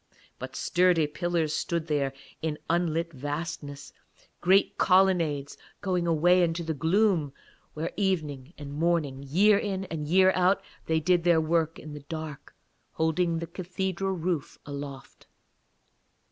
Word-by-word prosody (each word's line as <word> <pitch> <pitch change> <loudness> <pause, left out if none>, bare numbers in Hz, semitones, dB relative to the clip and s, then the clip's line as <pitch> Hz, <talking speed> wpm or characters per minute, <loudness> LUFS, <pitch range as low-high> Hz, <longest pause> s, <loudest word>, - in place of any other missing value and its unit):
But - - -7
sturdy 180 -3 +3
pillars 165 0 -1
stood 170 -2 -1
there 145 -4 0 0.3
in 155 -2 -2
unlit 170 -1 0
vastnesses; 145 0 -5 0.5
great 190 +3 +3
colonnades 175 -7 +2 0.2
going 180 -3 -1
away 175 +3 +4
into 170 0 0
the 160 -1 -2
gloom, 165 -1 +2 0.4
where 160 +2 -3
evening 155 -7 -2
and 140 -1 -8
morning, 155 -4 0
year 195 +9 +4
in 195 -2 -3
year 170 +5 +3
out, 185 +2 +2 0.2
they 160 0 +2
did 175 +2 +2
their 170 -2 +4
work 160 0 0
in 150 -1 -9
the 150 - -7
dark, 155 0 -8 0.4
holding 165 +1 +1
the 170 - -3
cathedral 190 +2 -3
roof 170 -4 -2
aloft. 140 -1 -8
165 Hz, 130 wpm, -28 LUFS, 150-180 Hz, 0.5 s, away